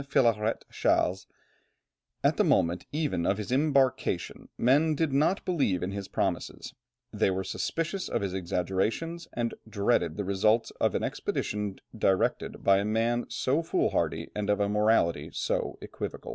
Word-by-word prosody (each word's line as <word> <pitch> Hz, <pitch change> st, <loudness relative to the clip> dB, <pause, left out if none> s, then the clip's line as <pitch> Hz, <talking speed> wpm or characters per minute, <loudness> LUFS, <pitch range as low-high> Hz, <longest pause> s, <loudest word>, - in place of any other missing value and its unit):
Philarète 115 Hz, -5 st, +1 dB
Chasles, 90 Hz, +1 st, +1 dB, 1.0 s
"at -, -, +3 dB
the -, -, +4 dB
moment 85 Hz, +1 st, +2 dB
even 150 Hz, -, -1 dB
of 95 Hz, +3 st, +1 dB
his 105 Hz, +2 st, -5 dB
embarkation 135 Hz, -1 st, +1 dB
men 150 Hz, +6 st, +3 dB
did 155 Hz, -2 st, 0 dB
not 155 Hz, +8 st, +2 dB
believe 135 Hz, -, +1 dB
in 95 Hz, -, -2 dB
his 100 Hz, -1 st, -5 dB
promises, -, -, -3 dB, 0.4 s
they -, -, +2 dB
were 95 Hz, 0 st, -1 dB
suspicious 170 Hz, -, -3 dB
of 115 Hz, -, -1 dB
his 95 Hz, -2 st, -2 dB
exaggerations, 95 Hz, -, -2 dB
and 120 Hz, -1 st, -1 dB, 0.2 s
dreaded 100 Hz, -6 st, +1 dB
the 105 Hz, -, -1 dB
results 105 Hz, +4 st, +2 dB
of -, -, +2 dB
an -, -, 0 dB
expedition 105 Hz, -2 st, -2 dB, 0.2 s
directed 95 Hz, -3 st, 0 dB
by 100 Hz, 0 st, +5 dB
a -, -, 0 dB
man 115 Hz, +3 st, +1 dB
so 140 Hz, +5 st, 0 dB
fool 165 Hz, -, 0 dB
hardy, -, -, -1 dB
and 105 Hz, -1 st, -3 dB
of 105 Hz, -, +2 dB
a 100 Hz, -, +2 dB
morality 105 Hz, -4 st, +2 dB
so -, -, -2 dB
equivocal." -, -, -6 dB
105 Hz, 155 wpm, -28 LUFS, 95-135 Hz, 1.0 s, by